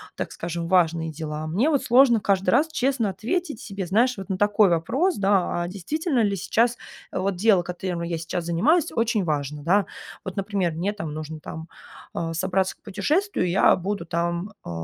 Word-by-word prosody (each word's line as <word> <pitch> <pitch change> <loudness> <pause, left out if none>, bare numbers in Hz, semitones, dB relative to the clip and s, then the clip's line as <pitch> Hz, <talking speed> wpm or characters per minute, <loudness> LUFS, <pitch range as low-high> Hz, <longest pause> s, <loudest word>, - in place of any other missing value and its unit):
так - - -4
скажем, 170 0 -4
важные 165 -3 +2
дела. 155 0 -5
Мне 205 - +1
вот 285 -4 +1
сложно 240 -3 +5
каждый 195 -2 +2
раз 290 +6 +4
честно 260 -7 0
ответить 245 - -3
себе, 195 -2 -5
знаешь, 235 +6 +2
вот 195 +1 -8
на 190 - -1
такой 205 0 +4
вопрос, 250 - +1
да: 195 -3 +1
а - - -3
действительно 250 - -1
ли 200 -1 +1
сейчас, 230 +6 +1 0.3
э, - - -4
вот 195 0 0
дело, 195 -1 +4
которым 180 -1 -4
я 170 0 -2
сейчас 165 +1 -4
занимаюсь, 300 - +2
очень 225 -4 +1
важно, 145 -1 -2
да? 195 +5 +3 0.4
Вот, 190 +1 -6
например, 195 -3 0
мне 180 +6 -2
там 165 -8 -5
нужно 155 0 -6
там, 160 0 -8 0.5
а, 165 -1 -3
собраться 185 +2 0
к - - -44
путешествию, 295 - 0
я 185 - +5
буду 200 +3 -3
там, 170 +4 -2
э, - - -7
190 Hz, 185 wpm, -24 LUFS, 170-225 Hz, 0.5 s, сложно